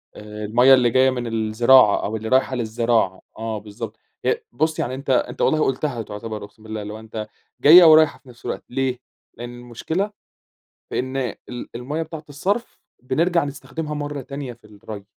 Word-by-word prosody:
آآ، 105 0 -7
المَيّة 125 +5 +6
اللي 125 -2 +5
جاية 130 +2 +4
من 125 -2 -3
الزراعة 115 +1 +4
أو 110 - -2
اللي 110 0 -4
رايحة 130 0 +2
للزراعة، 115 -4 0 0.2
آه، 110 -1 -3
بالضبط. 105 0 -8 0.3
هي - - +1
بُص، 155 +6 -1
يعني 130 +2 -2
أنت 135 0 -8
أنت 130 - +1
والله 155 - +3
قُلتها 135 -2 -1
تعتبر 105 0 -6
أقسم 105 +1 -14
بالله 110 -1 -5
اللي 105 +1 -6
هو 110 - -8
أنت 110 -1 -7 0.3
جاية 175 +4 +10
ورايحة 155 -2 +6
في 135 - -19
نفس 120 - -16
الوقت، - - -4
ليه؟ 130 -1 -1 0.4
لأن 120 0 -6
المشكلة 160 - -3 0.8
فإن 130 +1 -2 0.3
ال 120 -1 -7
المَيّة 145 +7 -3
بتاعة 160 -1 -8
الصرف، 200 - -2 0.2
بنرجع 165 +6 +1
نستخدمها 145 +2 -5
مرة 145 -1 -4
تانية 140 -1 -6
في 115 - -20
الري. 105 -1 -10
125 Hz, 175 wpm, -22 LUFS, 110-145 Hz, 0.8 s, جاية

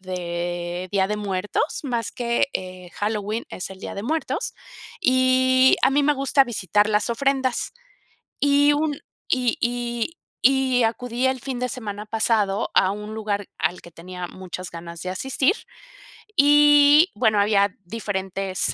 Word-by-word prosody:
de 175 -1 -4
Día 190 0 +2
de 210 - -2
Muertos, 205 - -2
más 235 -4 -2
que, 240 +2 0
eh, 185 -1 -6
Halloween, 210 +1 -2
es 185 - -4
el 190 - -10
Día - - -7
de 200 - -5
Muertos, 310 +8 -2 0.5
y 260 -1 +4
a - - +5
mí 285 +1 +2
me 295 +1 +3
gusta 275 0 +3
visitar 210 -3 +1
las 210 +2 +1
ofrendas. 265 +1 0 0.7
Y 285 +1 +4
un 295 -1 -1 0.3
y 250 -2 +1
y 240 +5 -2 0.2
y 260 -1 +3
acudí 240 +2 0
el 260 0 -1
fin 255 -1 -5
de 250 - -2
semana 210 -3 -5
pasado 215 -2 +1
a 185 - +4
un 210 +1 -6
lugar 205 -2 -3
al 165 +3 -1
que 170 - -14
tenía 180 +2 -8
muchas 185 0 -8
ganas 170 0 -8
de 185 - -4
asistir, 265 - +1 0.8
y, 295 +2 +6
bueno, 215 -4 +2
había 200 -1 +3
diferentes 195 -2 -1
225 Hz, 145 wpm, -23 LUFS, 190-260 Hz, 0.8 s, y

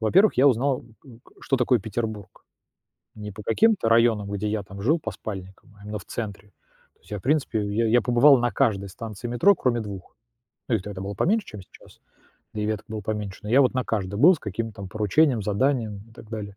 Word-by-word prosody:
Во-первых, 185 - +4
я 140 - +6
узнал, 130 +1 0 0.2
у 125 -5 -14
ка - - -24
что 135 - 0
такое 125 0 +2
Петербург, 110 -1 -5 0.7
не 105 -1 -7
по 105 +2 -10
каким-то 200 - +2
районам, 115 -3 +3
где 100 +1 -2
я 105 0 -2
там 95 0 -11
жил 150 +10 +3
по - - -4
спальникам, 95 0 -9
а - - -14
именно 105 0 -5
в 95 - -13
центре. 105 -1 -6 0.5
То - - -38
есть - - -22
я, 105 - -3
в - - -14
принципе, 135 -5 +1
я 110 +3 0
я 120 +2 +4
побывал 125 +3 +6
на 120 0 0
каждой 100 -7 +1
станции 110 +3 -8
метро, 120 - +4
кроме 120 -2 0
2. 100 -4 -8 0.5
Ну, 120 - +2
их 100 - -3
тогда 100 -2 -7
было 100 +1 -5
поменьше, 205 - +1
чем 105 - -9
сейчас, - - -19 0.5
да 105 - -3
и - - -1
веток 110 0 -3
было 110 0 -5
поменьше. 105 -2 -5
Но 105 - -7
я 130 +4 +6
вот 130 -1 +3
на 130 - 0
каждой 100 -1 -3
был 180 +7 +8
с 160 - -8
каким-то 110 +2 -5
там 100 -1 -8
поручением, 110 - +2
заданием 110 0 0
и - - -19
так 110 - -14
далее. 100 -3 -6
110 Hz, 225 wpm, -24 LUFS, 100-125 Hz, 0.7 s, был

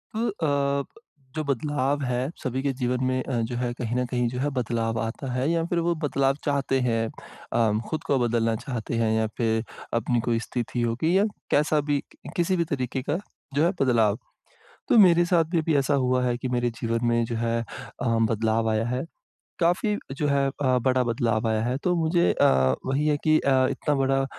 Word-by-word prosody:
अ, - - -2
अब 140 - 0 0.5
जो 155 - -1
बदलाव 145 0 -1
है 125 -1 0 0.2
सभी 130 0 -2
के 140 - +1
जीवन 125 0 -1
में 130 0 0
अ, 135 - -5
जो 115 +2 -3
है 120 0 -1
कहीं 120 -1 -3
न 125 0 +1
कहीं 125 0 0
जो 125 +1 -5
है 145 +3 0
बदलाव 115 -3 -1
आता 115 +4 -4
है 130 +4 0
या 165 -1 +1
फिर 170 0 0
वो 175 - +3
बदलाव 135 -1 +1
चाहते 140 -2 +1
हैं, 115 -2 +1 0.5
अ, 115 -2 +3 0.2
खुद 155 - -3
को 140 - +1
बदलना 115 -1 +1
चाहते 120 -1 -4
हैं 110 - +1
या 110 0 +1
फिर 110 -1 +1 0.4
अपनी 120 0 0
कोई 115 -1 +2
स्थिति 120 0 -3
होगी 125 +10 +1
या 200 - +4 0.3
कैसा 150 +1 +3
भी 140 -1 +1 0.3
किसी 180 +2 +1
भी 170 - +2
तरीके 130 -1 -2
का 150 - +1 0.4
जो 145 +3 +2
है 175 - +3
बदलाव। 115 -5 +3 0.7
तो - - +5
मेरे 175 -4 +6
साथ 170 -2 +3
भी 175 - +1
अभी 160 -1 0
ऐसा 140 +1 +1
हुआ 125 0 +2
है 125 -1 +1
कि 130 - -4
मेरे 120 -1 +1
जीवन 115 0 0
में 120 0 +2
जो 115 - -4
है 115 0 0
अ, 125 +2 -8 0.3
बदलाव 110 0 +1
आया 110 +1 +1
है। 125 +4 -2 0.6
काफ़ी 180 +5 +2 0.2
जो 150 - 0
है 140 -1 +2 0.2
अ, 130 -2 +3
बड़ा 130 -1 +3
बदलाव 115 -1 0
आया 110 0 +1
है, 125 +3 0
तो 180 +5 0
मुझे 170 +1 +2
अ, - - +3 0.4
वही 135 +3 0
है 150 -1 +3
कि 155 0 +5
अ, 130 -1 +3
इतना 150 - -1
बड़ा 135 0 +1
130 Hz, 205 wpm, -25 LUFS, 115-145 Hz, 0.7 s, मेरे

